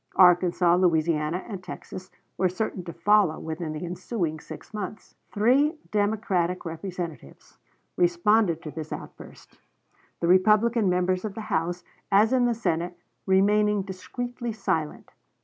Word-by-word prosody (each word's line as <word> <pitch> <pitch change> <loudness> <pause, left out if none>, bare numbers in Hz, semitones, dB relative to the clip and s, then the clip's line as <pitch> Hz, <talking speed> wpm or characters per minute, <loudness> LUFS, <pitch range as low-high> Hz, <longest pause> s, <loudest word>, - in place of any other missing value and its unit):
Arkansas, 180 -1 +5
Louisiana, 165 -1 +1
and 195 -5 -7
Texas 185 +1 -9 0.3
were 185 0 +1
certain 185 0 -3
to 170 - -5
follow 190 -1 +3
within 160 0 -5
the 155 +3 -5
ensuing 175 -2 -3
six - - -11
months. 210 0 -6 0.2
Three 270 +9 +3
Democratic 205 -4 0
Representatives 165 - -7 0.4
responded 175 0 +2
to 155 - -6
this 155 0 -7
outburst, - - -10 0.6
the 170 - 0
Republican 210 +4 +4
members 180 +1 +1
of 210 -3 -5
the 225 - -5
House, 175 +2 -1 0.3
as 210 +5 +5
in 250 -1 +3
the 240 -1 +1
Senate, 175 -5 -2 0.3
remaining 205 +1 +3
discreetly 240 +5 -5
silent. 160 -7 -3
185 Hz, 130 wpm, -26 LUFS, 170-210 Hz, 0.6 s, Arkansas